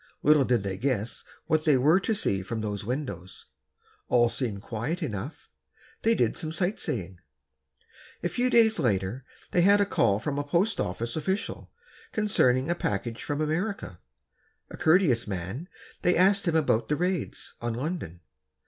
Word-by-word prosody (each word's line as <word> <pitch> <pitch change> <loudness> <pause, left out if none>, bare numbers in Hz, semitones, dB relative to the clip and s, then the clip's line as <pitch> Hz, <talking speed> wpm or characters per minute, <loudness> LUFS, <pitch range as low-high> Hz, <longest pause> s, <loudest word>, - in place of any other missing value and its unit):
Little 150 -2 +5
did 120 -5 +1
they 95 -1 -4
guess 120 -4 -1 0.2
what 155 -1 +1
they 150 -4 +4
were 155 +8 +4
to 220 +3 -1
see 100 - +1
from 110 +4 -4
those 105 -2 -3
windows. 100 - -5 0.6
All 120 -1 +4
seemed 115 -5 -3
quiet 135 +11 -3
enough. 120 +1 -5 0.5
They 230 +1 +3
did - - +1
some 155 -2 -3
sight 180 +5 -1
seeing. 95 - -3 1.0
A - - +2
few 250 +1 0
days 225 -2 +4
later, 100 +1 0 0.3
they 175 - +3
had 200 +3 +6
a 205 - +4
call 115 - +2
from 145 +5 -2
a - - -1
post 175 +9 0
office 115 +6 -3
official, 190 +7 -3 0.4
concerning 130 - +3
a 170 - +2
package 115 - -3
from 145 +1 -3
America. 160 - -2 0.7
A - - -7
courteous 160 - +3
man, 100 - -5 0.3
they 180 - +3
asked 195 +1 +4
him 165 - +1
about 145 -7 +2
the 150 - +2
raids, 180 -1 -2
on 120 -1 -2
London. 125 - -4
140 Hz, 160 wpm, -27 LUFS, 110-175 Hz, 1.0 s, had